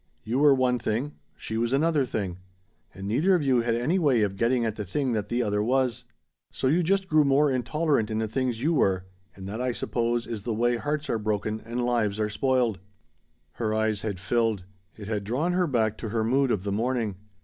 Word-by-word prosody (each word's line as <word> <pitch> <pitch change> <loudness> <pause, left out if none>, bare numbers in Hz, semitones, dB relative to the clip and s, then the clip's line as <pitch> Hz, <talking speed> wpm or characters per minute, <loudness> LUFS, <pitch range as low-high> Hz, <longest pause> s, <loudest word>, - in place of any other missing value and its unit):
You 120 +4 -1
were 145 -1 +6
one 125 -1 +1
thing; 120 +7 -2 0.2
she 110 0 -4
was 120 +2 0
another 150 0 +2
thing. 95 -6 -3 0.5
And 95 +1 -8
neither 155 - +3
of 170 - 0
you 130 -3 +3
had 115 0 0
any 150 +11 +1
way 135 -9 +3
of 100 -1 -1
getting 120 +3 +1
at 110 -2 -2
the 105 - -4
thing 130 +7 -1
that 105 -2 -2
the 120 +1 +1
other 105 -1 0
was. 125 +1 0 0.5
So - - -4
you 155 +7 +3
just 190 +3 +1
grew 155 -2 +4
more 140 +1 +3
intolerant 130 -1 0
in 110 - -2
the 110 0 0
things 125 +1 -2
you 165 +3 +2
were, 95 - +2 0.3
and 95 -1 -9
that, 110 +5 -4
I 125 0 0
suppose, 120 0 -1
is 110 -3 -5
the 110 +2 -3
way 120 +2 +2
hearts 150 +4 -2
are 115 - -1
broken 110 0 -2
and 120 +1 -3
lives 110 -4 0
are 105 0 0
spoiled." 125 -3 +1 0.7
Her 110 -2 -2
eyes 110 -2 0
had 100 -4 -4
filled. 110 0 0 0.3
It 105 -2 -8
had 105 -2 -2
drawn 140 - -1
her 180 -1 +2
back 110 -6 0
to 110 - -4
her 110 +1 0
mood 135 +4 +2
of 100 -6 0
the 100 - -2
morning. 115 -2 -1
120 Hz, 220 wpm, -26 LUFS, 110-135 Hz, 0.7 s, were